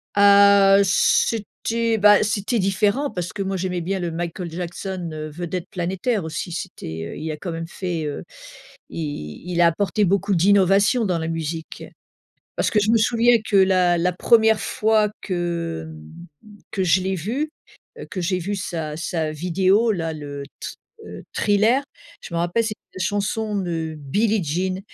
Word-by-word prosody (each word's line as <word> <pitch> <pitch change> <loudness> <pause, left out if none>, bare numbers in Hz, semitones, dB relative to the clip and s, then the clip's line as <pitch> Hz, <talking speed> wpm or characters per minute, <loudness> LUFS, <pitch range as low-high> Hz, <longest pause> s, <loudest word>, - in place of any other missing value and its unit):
Ah, 200 -1 +7
heu, - - +5
c'était 225 +3 +1
bah 205 0 +6
c'était 210 +2 -1
différent 205 +8 +1
parce 175 -2 -4
que 200 - -4
moi, 195 0 -2
j'aimais 180 -1 -2
bien 190 +3 -2
le 175 -2 -3
Michael 170 +1 -4
Jackson, 175 +1 -5
heu, 155 0 -5
vedette 175 +3 -5
planétaire 190 +4 -2
aussi, 160 +2 -5
c'était, 80 - -6
heu, - - -8
il 160 +1 -4
a 155 - -5
quand 175 +2 -5
même 165 0 -5
fait, 175 -3 -4
heu, 145 - -4 0.7
il 145 - -6
il 175 -1 0
a 170 - +6
apporté 195 +4 +1
beaucoup 200 +1 +1
d'innovation 200 +5 +4
dans 180 -4 0
la 160 0 -3
musique. 165 0 -5 0.7
Parce - - +1
que 215 - +2
je 210 +2 +2
me 230 - +5
souviens 235 +2 +4
que 210 - -2
la 185 -2 +4
la 180 +1 +1
première 220 +3 +4
fois 215 -1 +1
que 170 - -3 0.6
mmh, 210 -1 -15
que 190 - -1
je 185 +1 +3
l'ai 190 +1 -1
vu, 245 - -3 0.5
heu, - - -8
que 185 - -4
j'ai 180 +1 0
vu 200 +4 -3
sa 165 -5 -4
sa 160 -1 -2
vidéo 185 +7 +2
là, 165 -5 -2
le 145 -2 -7 0.2
t, - - -5 0.4
heu, - - -9
Thriller, 220 +6 +2 0.4
je - - -10
m'en 170 - 0
rappelle, 175 +7 +1
c'était 215 -1 -4 0.2
une 185 - -5
chanson 205 +2 -1
de 165 -4 -3
Billie 205 +9 0
Jean. 185 +5 -1
185 Hz, 175 wpm, -22 LUFS, 170-205 Hz, 0.7 s, Ah